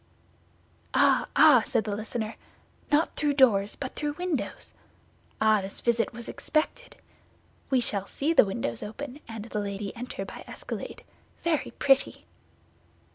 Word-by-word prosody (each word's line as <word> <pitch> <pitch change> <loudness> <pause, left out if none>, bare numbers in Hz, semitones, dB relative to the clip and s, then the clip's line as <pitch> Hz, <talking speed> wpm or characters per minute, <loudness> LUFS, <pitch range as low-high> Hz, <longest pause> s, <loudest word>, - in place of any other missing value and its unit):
"Ah, - - +4
ah!" 275 -7 +8
said 220 - 0
the 205 0 -2
listener, 220 +1 -4 0.6
"not 300 +3 +2
through 295 -2 +1
doors, 215 -7 +4
but 265 -2 -6
through 295 -1 -2
windows! 355 -3 -3 0.7
Ah, 215 -1 +4
this 195 +1 -3
visit 235 -1 +1
was 235 -1 -9
expected. 320 +11 -2 0.7
We 260 -2 +3
shall 200 -4 0
see 305 +4 0
the - - +8
windows 115 - -3
open, 275 +5 -7
and 225 -2 -6
the 225 -2 -3
lady 200 0 -4
enter 245 +2 -5
by - - -9
escalade. - - -7 0.4
Very 335 -3 +1
pretty!" 270 -1 +2
235 Hz, 135 wpm, -28 LUFS, 210-290 Hz, 0.7 s, ah